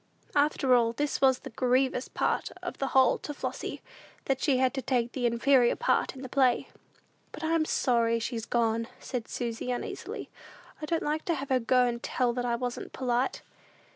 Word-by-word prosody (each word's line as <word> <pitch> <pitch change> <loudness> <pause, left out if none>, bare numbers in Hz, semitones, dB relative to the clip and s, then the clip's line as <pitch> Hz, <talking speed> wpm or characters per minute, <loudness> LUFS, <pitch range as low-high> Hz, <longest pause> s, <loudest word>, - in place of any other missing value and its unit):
After 285 -2 +3
all, 230 -2 +4
this 290 +4 -2
was 265 -2 +5
the - - -10
grievous 255 +2 +1
part - - -1
of - - -5
the 275 - 0
whole 265 0 +4
to 295 - -6
Flossy, - - -5 0.4
that 270 -1 0
she 275 -4 +3
had 260 0 +2
to 270 - -2
take 245 -2 -1
an 250 -2 -1
inferior 240 +1 +4
part 485 - +1
in 265 - -9
the - - -5
play. 255 -1 +2 0.6
"But - - -9
I'm 320 0 +2
sorry 235 -5 +2
she's 230 0 -3
gone," 230 -1 +1
said 245 -4 -5
Susy, 235 0 -4
uneasily. 245 - -5 0.5
"I 305 - -4
don't 330 0 0
like 305 +1 -1
to 340 - +1
have 275 0 -5
her 260 -1 +3
go 250 +1 +3
and 235 -1 -2
tell 245 -2 0
that 245 0 -2
I 240 -1 +1
wasn't 245 0 -4
polite." 250 0 -1
255 Hz, 190 wpm, -29 LUFS, 240-270 Hz, 0.6 s, was